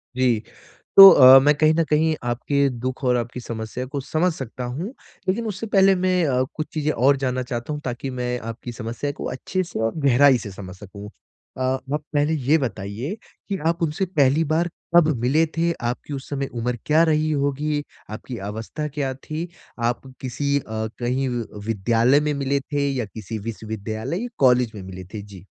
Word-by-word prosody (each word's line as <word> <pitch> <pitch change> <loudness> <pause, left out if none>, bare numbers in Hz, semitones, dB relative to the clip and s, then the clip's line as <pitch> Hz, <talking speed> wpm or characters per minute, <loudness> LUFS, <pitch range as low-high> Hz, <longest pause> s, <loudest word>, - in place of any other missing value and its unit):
जी, 125 -4 +2 0.6
तो 195 0 +14
अ, 130 -3 +9
मैं 150 +1 +5
कहीं 155 +1 +4
न 165 - +3
कहीं 155 +1 +2
आपके 140 +4 0
दुख 130 +2 -5
और 125 -1 +3
आपकी 120 +1 -4
समस्या 115 +1 -5
को 140 +2 -5
समझ 165 +6 0
सकता 130 -3 -7
हूँ। 190 - -5 0.3
लेकिन 225 +5 0
उससे 215 +2 -4
पहले 195 -2 +5
मैं 185 -1 +1
अ, 130 -3 +2
कुछ 155 - -3
चीज़ें 155 -1 0
और 135 +1 +3
जानना 130 0 0
चाहता 125 +3 -4
हूँ 150 - -5
ताकि 125 +2 -4
मैं 125 0 -1
आपकी 120 +2 -8
समस्या 120 +4 -4
को - - -5
अच्छे 185 +8 -2
से 170 - -6
और 110 0 0
गहराई 135 0 +6
से 100 - -6
समझ 95 -1 -9
सकूँ। 100 +1 -10 0.5
अ, - - -5
आप 130 +3 -1
पहले 145 +2 +2
ये 150 +1 +2
बताइए 120 - -4 0.3
कि 195 - -1
आप 170 0 0
उनसे 160 +4 0
पहली 145 +2 +4
बार 160 +3 +1 0.3
कब 170 -2 +7
मिले 150 +7 +3
थे? 170 +1 +2
आपकी 120 +3 -4
उस 135 -1 -7
समय 140 -1 -2
उम्र 120 +1 -2
क्या 155 +2 +4
रही 155 0 +1
होगी? 145 +1 -1 0.3
आपकी 115 +3 -7
अवस्था 115 +8 -5
क्या 140 -2 -3
थी? 155 +5 -5 0.4
आप 120 - -3 0.2
किसी 140 +3 -1
अ, - - -12 0.4
कहीं 125 +2 0 0.4
विद्यालय 115 +5 +3
में 150 0 -1
मिले 140 0 0
थे? 140 +1 -2
या 125 -4 -2
किसी 110 +1 -7
विश्वविद्यालय 110 - -4
या - - -3
कॉलेज 125 -3 +4
में 100 - -7
मिले 95 0 -8
थे? 105 - -5
जी। 100 -2 -13
135 Hz, 190 wpm, -23 LUFS, 120-155 Hz, 0.6 s, तो